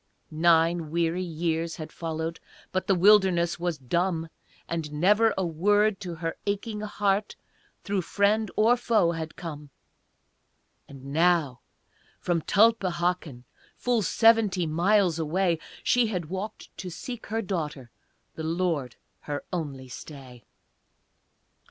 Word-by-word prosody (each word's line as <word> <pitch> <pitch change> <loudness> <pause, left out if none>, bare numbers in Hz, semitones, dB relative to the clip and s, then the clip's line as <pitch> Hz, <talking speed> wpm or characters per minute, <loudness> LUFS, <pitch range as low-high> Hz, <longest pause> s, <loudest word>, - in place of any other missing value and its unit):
Nine 165 0 +3
weary 170 +2 0
years 165 -1 -2
had 155 -1 -8
followed, 165 0 -4 0.3
But 185 +1 -2
the 195 - +4
wilderness 180 -3 +4
was 175 -2 -1
dumb, 165 +5 -1 0.4
And 165 -3 -3
never 205 +8 +4
a 190 - 0
word 205 +5 +2
to 180 -4 -6
her 165 0 -4
aching 210 +1 -2
heart 205 -1 -1 0.5
Through 200 -1 -1
friend 205 +4 +1
or 225 +3 +5
foe 215 -8 +2
had 160 -1 -5
come, 150 -4 -8 1.2
And 135 0 -10
now, 160 -6 +2 0.6
from 170 -2 0
Tulpehocken, 180 - +1 0.3
Full 245 -2 +1
seventy 215 -3 +3
miles 175 +2 +2
away, 170 +1 +1 0.2
She 245 -2 +3
had 180 -7 -3
walked 190 +3 -6
to 185 - -6
seek 225 +8 -7
her 225 +2 -2
daughter, 150 - -4 0.4
The 160 - -7
Lord 160 -6 -1 0.3
her 145 -1 -4
only 140 -7 -4
stay. 130 -2 -11
175 Hz, 120 wpm, -27 LUFS, 160-200 Hz, 1.2 s, or